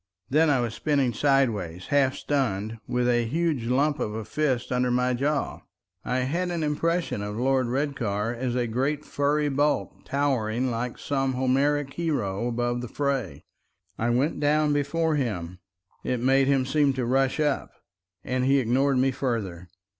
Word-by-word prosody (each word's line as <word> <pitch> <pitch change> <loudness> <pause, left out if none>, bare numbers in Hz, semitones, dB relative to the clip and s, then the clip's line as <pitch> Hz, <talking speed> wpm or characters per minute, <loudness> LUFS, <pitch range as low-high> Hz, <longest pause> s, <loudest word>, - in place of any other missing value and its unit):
Then 155 +3 +4
I 135 -4 +3
was 115 -2 -2
spinning 140 -4 +1
sideways, 110 - +1
half 140 -2 +3
stunned, 115 -6 -1
with 125 0 0
a 120 -1 +3
huge 155 -2 0
lump 145 +4 +1
of 105 - -2
a 110 -1 -4
fist 135 0 -1
under 125 0 +1
my 125 +1 +1
jaw. 140 +4 -1 0.4
I 125 +2 0
had 170 +8 -1
an 170 -2 -2
impression 165 -4 0
of 105 +1 -4
Lord 130 0 +2
Redcar 120 -5 -1
as 120 0 -2
a 125 -1 +1
great 135 +6 -1
furry 145 +1 +1
bulk, 145 +1 +1
towering 130 -3 0
like 120 +1 -3
some 135 -2 -1
Homeric 135 +2 +1
hero 120 - -1
above 120 0 -1
the 125 - -5
fray. 130 - -2 0.6
I 115 - +1
went 130 +7 +1
down 150 0 +2
before 155 +2 0
him—it 90 0 -5
made 135 +2 +3
him 135 -2 +2
seem 140 +1 +2
to 130 -2 -2
rush 135 +3 +1
up—and 125 - -3
he 135 +1 +4
ignored 130 +2 +2
me 135 +1 +3
further. 105 -10 -3
130 Hz, 155 wpm, -26 LUFS, 115-145 Hz, 0.6 s, Then